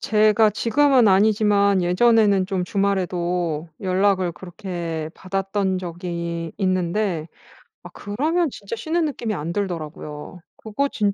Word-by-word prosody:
제가 215 0 +4
지금은 245 +2 +3
아니지만 200 -1 +3
예전에는 200 +1 +3
좀 190 -3 -1
주말에도 180 -5 -1
연락을 185 -1 +1
그렇게 170 -3 -6
받았던 195 0 -2
적이 170 -2 -5
있는데 185 -2 -1 0.6
아 - - -9
그러면 305 +10 -1
진짜 205 -1 -7
쉬는 320 +6 -1
느낌이 235 -7 -3
안 165 0 -4
들더라고요. 165 -4 -5 0.2
그거 225 +6 -2
진 205 -2 0
195 Hz, 280 characters per minute, -22 LUFS, 175-215 Hz, 0.6 s, 제가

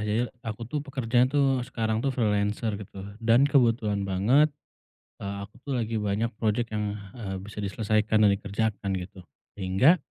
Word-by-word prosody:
Jadi 105 +3 +1 0.2
aku 115 +1 -5
tuh 145 +5 -3
pekerjanya 130 -3 +1
tuh 140 0 +3
sekarang 110 -3 -1
tuh 135 - 0
freelancer 105 -2 0
gitu 95 -1 -9 0.2
dan 115 +4 +5
kebetulan 115 -8 +2
banget, 120 +11 +4 0.7
eee, 100 0 -5
aku 100 +1 -10
tuh 140 - -2
lagi 115 -3 -1
banyak 105 +2 0
project 115 +1 0
yang, 105 -1 -2 0.2
eee, 95 -4 -4
bisa 105 +2 -11
diselesaikan 110 +2 +1
dan 105 - +7
dikerjakan 100 0 -2
gitu, 95 0 -6 0.3
sehingga 100 - +4
110 Hz, 155 wpm, -27 LUFS, 100-120 Hz, 0.7 s, dan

